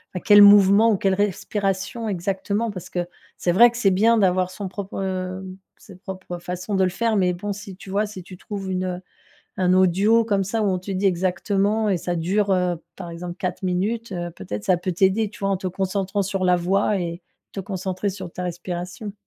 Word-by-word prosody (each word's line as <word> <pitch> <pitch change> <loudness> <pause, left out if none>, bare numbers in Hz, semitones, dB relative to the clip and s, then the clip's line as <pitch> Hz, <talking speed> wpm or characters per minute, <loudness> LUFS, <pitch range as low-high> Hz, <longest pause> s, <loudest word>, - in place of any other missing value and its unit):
bah, 180 - -3
quel 205 -1 +8
mouvement 205 +2 +7
ou 205 - +2
quelle 195 0 +1
respiration 205 +2 -2
exactement 200 +4 -2
parce 185 -2 -8
que 175 -1 -3 0.3
c'est 175 - 0
vrai 235 +6 +8
que 235 - -8
c'est 200 -5 +3
bien 225 +5 +4
d'avoir 185 -2 +2
son 200 +1 -5
propre 190 -1 -4 0.3
sa 195 - -15
propre 185 -2 -7
façon 180 +3 -4
de 190 - +3
le - - +1
faire, 225 +2 0
mais 180 -2 +2
bon, 205 +4 -4
si 200 -1 -9
tu 190 - -13
vois, 205 +2 +1
si 195 -3 -9
tu 185 +1 -12
trouves 195 0 -6
une 185 -1 -2 0.6
un 180 -1 +3
audio 195 +5 +4
comme 200 -3 +1
ça 220 +4 -1
où 205 - +2
on 185 - 0
te 185 +2 -8
dit 190 +1 0
exactement 195 +4 +1
et 185 - +1
ça 175 +1 -3
dure, 195 +5 0
heu, 180 -1 +1 0.2
par 175 -3 -7
exemple 175 +1 -6
4 185 +1 -3
minutes, 205 +5 -1
heu, 175 -1 -4
peut-être 105 - -6
ça 180 - +3
peut 180 +1 -2
t'aider, 190 +5 +2
tu - - -14
vois, 195 0 0
en 195 - +2
te 185 - -5
concentrant 190 +2 -1
sur 195 -1 -2
la 180 -1 +4
voix 195 +3 +1
et 170 -1 -4 0.3
te 195 - -4
concentrer 190 0 -3
sur 185 -3 -8
ta 180 - -5
respiration. 180 +3 -5
190 Hz, 210 wpm, -23 LUFS, 180-205 Hz, 0.6 s, quel